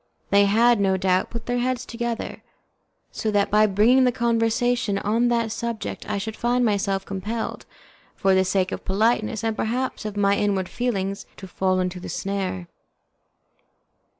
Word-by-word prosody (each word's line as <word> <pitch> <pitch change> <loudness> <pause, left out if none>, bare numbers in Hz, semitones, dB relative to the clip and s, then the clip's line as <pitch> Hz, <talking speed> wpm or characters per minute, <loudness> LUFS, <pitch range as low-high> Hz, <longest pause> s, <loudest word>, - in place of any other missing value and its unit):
They 200 0 +6
had, 230 +3 +4
no 190 -1 +2
doubt, 185 0 +1
put 235 -1 -7
their 245 0 -1
heads 255 0 -1
together, 235 -1 -4 0.7
so 220 - -2
that 205 -1 +1
by 215 +1 +5
bringing 220 +6 +4
the 250 - +4
conversation 230 -2 +1
on 225 +4 +1
that 235 -2 +1
subject 230 -2 -4
I 210 - -1
should 215 +2 -4
find 245 +1 +1
myself 195 -2 0
compelled, 210 +4 -4 0.5
for 195 0 +2
the 190 0 +4
sake 190 0 0
of - - -5
politeness 220 +2 +1
and 225 -1 0
perhaps 250 +5 -2
of 210 -1 -5
my 200 0 +3
inward 195 -3 0
feelings, 200 -5 -2
to 190 - -9
fall 185 0 0
into 180 0 -2
the - - -8
snare. 190 -2 -3
210 Hz, 160 wpm, -23 LUFS, 195-235 Hz, 0.7 s, They